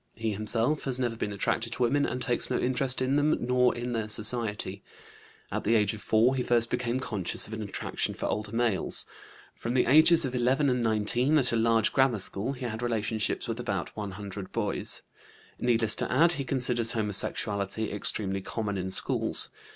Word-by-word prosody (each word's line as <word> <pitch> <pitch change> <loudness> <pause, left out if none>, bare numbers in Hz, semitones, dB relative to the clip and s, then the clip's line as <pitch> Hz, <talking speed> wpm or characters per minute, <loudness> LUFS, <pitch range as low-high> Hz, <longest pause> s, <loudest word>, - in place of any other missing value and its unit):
He 115 0 -2
himself 115 +8 +1
has 130 -2 0
never 120 -3 -1
been 105 -2 -4
attracted 115 +3 -2
to 125 - -1
women, 140 +4 +1
and 125 - -3
takes 125 -1 0
no - - 0
interest 130 0 0
in 135 +2 +1
them 150 +1 +2
nor 125 0 +1
in 120 +1 -4
their 110 -2 -3
society. 105 -3 +2 0.7
At - - -3
the 115 +3 +2
age 105 -1 +2
of 110 - -9
4 115 +4 +2
he 130 - -1
first 120 -1 +2
became 125 +1 -1
conscious 105 -8 -1
of 110 - -9
an 110 - -5
attraction 100 -2 -4
for - - -5
older 105 -1 -3
males. 115 -3 0 0.5
From 120 +2 -5
the 125 - +3
ages 160 +4 +6
of 130 - -4
11 130 +3 +1
and 125 -1 0
19, 115 +6 +2
at 130 -4 +2
a - - +2
large 115 -1 +2
grammar 130 -4 +3
school, 100 +6 -1
he 125 -1 -7
had 110 -1 -5
relationships 110 -2 -2
with - - -4
about - - -4
one 100 -2 -5
hundred 100 -1 -8
boys. - - -2 0.6
Needless 115 -3 +2
to - - -2
add, 165 +7 +4
he 140 -5 -4
considers 125 -3 +2
homosexuality 105 -1 -1
extremely 95 -1 -2
common 100 -1 -4
in 95 +1 -4
schools. 95 - +1
115 Hz, 190 wpm, -27 LUFS, 105-125 Hz, 0.7 s, ages